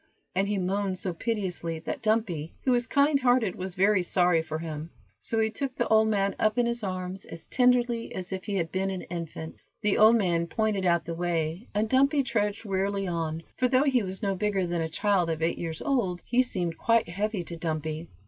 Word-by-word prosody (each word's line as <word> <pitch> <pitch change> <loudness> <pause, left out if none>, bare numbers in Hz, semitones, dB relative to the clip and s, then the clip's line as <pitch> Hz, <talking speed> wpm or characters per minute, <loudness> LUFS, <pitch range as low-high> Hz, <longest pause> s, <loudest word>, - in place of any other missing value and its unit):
and 195 +2 +1
he 205 0 0
moaned 190 +1 -1
so 180 -1 -2
piteously 180 -5 -3
that 160 - -5
Dumpy, 215 -9 0
who 260 - +2
was 240 -1 +2
kind 280 0 +3
hearted, 245 -6 +3
was 185 0 -6
very 200 +1 +4
sorry 175 -1 +3
for 155 -1 -4
him; 160 -1 -5 0.3
so 225 - -2
he 220 0 +2
took 270 +1 -4
the - - 0
old 220 0 +5
man 200 -2 +1
up 215 +1 +2
in 245 - +3
his 235 -1 -2
arms 185 0 -4
as 165 - -9
tenderly 245 -2 +2
as 185 0 -5
if 190 -1 -5
he 205 - -2
had 170 -4 -1
been 190 +1 0
an 190 -2 -4
infant. 165 -2 -6 0.3
The 210 -1 +2
old 220 +2 +8
man 170 -6 +1
pointed 205 0 0
out 170 -1 +2
the 170 - -4
way, 170 +3 -2
and 215 +1 +2
Dumpy 275 +4 +3
trudged 210 -3 -1
wearily 195 0 -1
on, 165 -2 -2
for 255 - +3
though 255 +2 +3
he 265 -4 +3
was 190 +2 -5
no 195 -1 +1
bigger 195 -1 0
than 170 -1 -1
a 160 - -2
child 180 +2 +1
of 160 0 -2
eight 165 - 0
years 165 -2 -4
old, 210 -11 0
he 245 +1 +3
seemed 175 -9 -3
quite 230 -1 +3
heavy 200 +2 -2
to 170 - -7
Dumpy. 160 -1 -3
195 Hz, 215 wpm, -27 LUFS, 170-220 Hz, 0.3 s, old